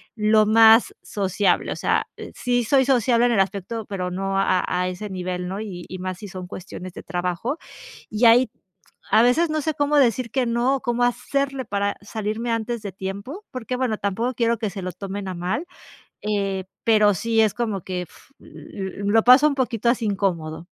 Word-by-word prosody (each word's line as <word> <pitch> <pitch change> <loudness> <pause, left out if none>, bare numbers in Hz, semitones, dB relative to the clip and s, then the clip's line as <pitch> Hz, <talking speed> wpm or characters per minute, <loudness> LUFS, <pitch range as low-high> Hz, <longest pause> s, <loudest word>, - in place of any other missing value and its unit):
lo 215 0 +4
más 225 +1 +6
sociable, 200 0 0
o - - -8
sea, - - 0 0.3
sí 245 -1 0
soy 265 +3 +3
sociable 245 -2 +3
en 240 - +1
el 210 - +2
aspecto, 200 +3 -3
pero, 185 -3 -3
no 195 +1 -2
a 185 -2 +2
a 180 0 0
ese 185 +3 -6
nivel, 180 -1 -4
¿no? 195 - -4
Y 180 -5 -7
y 185 0 -7
más 185 0 -5
si 205 -2 -8
son 185 -1 -7
cuestiones 185 0 -8
de - - -9
trabajo 180 - -2 0.5
y 215 +3 -3
ahí 235 +1 +6 0.6
a 220 +2 +6
veces 310 +7 +3
no 310 0 -1
sé 315 +1 -1
cómo 290 0 +1
decir 250 -3 +3
que 260 -2 +1
no, 240 +3 +1
o - - -12
cómo 240 0 0
hacerle 270 +2 -1
para 200 0 -1
salirme 215 +3 -3
antes 230 0 -2
de 200 - -5
tiempo 200 - -6
porque, 255 -2 -4
bueno, 250 -4 0
tampoco 225 +6 -2
quiero 235 -1 +1
que 220 -2 -1
se 195 0 -6
lo 185 - -3
tomen 195 +1 -6
a - - -4
mal, 180 - -2 0.6
eh, 200 -2 -1 0.2
pero, 210 -2 +4
sí 225 +5 +1
es 215 - +2
como 220 -6 -2
que 180 0 -4
uf, - - -20
l 195 0 -8
lo 220 +2 +4
paso 255 +4 +8
un 285 - -1
poquito 240 -3 0
así 235 -2 0
incómodo. 175 -5 -2
215 Hz, 195 wpm, -23 LUFS, 190-240 Hz, 0.6 s, paso